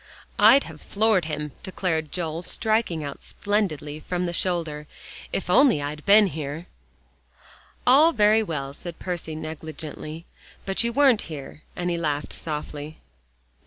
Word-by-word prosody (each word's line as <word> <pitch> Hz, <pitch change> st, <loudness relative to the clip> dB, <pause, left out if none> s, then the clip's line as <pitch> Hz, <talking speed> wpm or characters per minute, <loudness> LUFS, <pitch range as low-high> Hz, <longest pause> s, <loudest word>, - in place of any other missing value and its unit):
"I'd 280 Hz, -, +7 dB
have 155 Hz, -2 st, -11 dB
floored 210 Hz, -4 st, +2 dB
him," 150 Hz, -1 st, -4 dB
declared 165 Hz, -5 st, -2 dB
Joel, 165 Hz, -2 st, -3 dB
striking 215 Hz, -5 st, 0 dB
out 140 Hz, -1 st, -6 dB
splendidly 160 Hz, -8 st, -2 dB
from 180 Hz, +3 st, -2 dB
the 175 Hz, -, -3 dB
shoulder, 165 Hz, -5 st, -1 dB, 0.4 s
"if 195 Hz, -, -2 dB
I'd 180 Hz, -, +1 dB
only 265 Hz, -, +6 dB
have 145 Hz, +1 st, -5 dB
been 205 Hz, +1 st, +8 dB
here." 155 Hz, -1 st, -4 dB, 1.2 s
"All 290 Hz, +7 st, +7 dB
very 215 Hz, -3 st, +4 dB
well," 140 Hz, -9 st, -4 dB
said 170 Hz, +3 st, -8 dB
Percy 175 Hz, -3 st, -4 dB
negligently, 155 Hz, 0 st, -7 dB, 0.4 s
"but 195 Hz, +3 st, 0 dB
you 235 Hz, -, 0 dB
weren't 270 Hz, -3 st, +4 dB
here," 150 Hz, -1 st, -8 dB
and 175 Hz, 0 st, -1 dB
he 170 Hz, -, -1 dB
laughed 150 Hz, -3 st, -2 dB
softly. 150 Hz, -1 st, -6 dB
165 Hz, 140 wpm, -25 LUFS, 150-200 Hz, 1.2 s, been